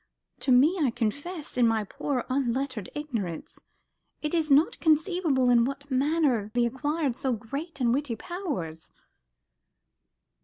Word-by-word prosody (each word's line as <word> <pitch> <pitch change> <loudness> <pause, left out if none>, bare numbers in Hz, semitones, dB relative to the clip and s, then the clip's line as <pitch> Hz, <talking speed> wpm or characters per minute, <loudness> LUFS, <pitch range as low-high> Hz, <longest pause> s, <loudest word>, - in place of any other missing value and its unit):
To 265 - 0
me, 295 +9 +5
I 280 - +3
confess, 285 - -4
in 240 - +5
my 225 -1 +1
poor 250 +5 -3
unlettered 260 -4 -1
ignorance, 230 - -5 0.6
it 300 - -1
is 320 -2 +1
not 285 +3 +4
conceivable 315 -5 +2
in 235 -1 +5
what 275 +3 -4
manner 265 -5 +2
thee 240 -1 +3
acquired 285 +2 -1
so 260 0 -1
great 280 +9 -6
and 240 -2 +2
witty 270 -3 -1
powers." 220 - -5
270 Hz, 130 wpm, -27 LUFS, 235-300 Hz, 0.6 s, me